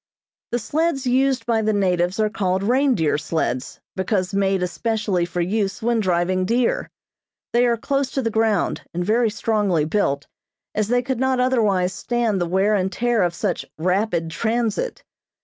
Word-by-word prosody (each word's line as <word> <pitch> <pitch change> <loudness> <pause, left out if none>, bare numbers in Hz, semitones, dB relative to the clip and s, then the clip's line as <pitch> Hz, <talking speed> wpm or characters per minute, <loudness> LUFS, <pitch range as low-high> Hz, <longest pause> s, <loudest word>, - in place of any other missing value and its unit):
The 240 - +1
sleds 290 +4 -1
used 255 -1 +2
by 230 -2 +1
the 215 0 +1
natives 180 -1 +1
are 215 - +3
called 190 -3 0
reindeer 240 - +2
sleds 145 -5 -2 0.2
because 190 0 -1
made 195 -1 +1
especially 210 -2 -1
for 175 0 -2
use 195 +2 -1
when 235 0 +2
driving 185 -1 +1
deer. 235 +5 0 0.6
They 240 +1 +4
are 235 -1 +2
close 275 +3 -1
to 270 - -1
the 225 - 0
ground, 220 -3 +1
and 175 0 -1
very 225 +3 +2
strongly 205 -7 0
built, 155 -5 0 0.5
as 215 -1 0
they 245 +2 +1
could 260 -1 -2
not 260 -1 +1
otherwise 210 -8 +2
stand 230 -3 -1
the 175 - 0
wear 190 +4 +2
and 190 -2 +1
tear 240 +2 +1
of 175 -1 +1
such 190 -1 -2
"rapid 180 -1 0
transit." 230 - -1
210 Hz, 165 wpm, -22 LUFS, 185-240 Hz, 0.6 s, They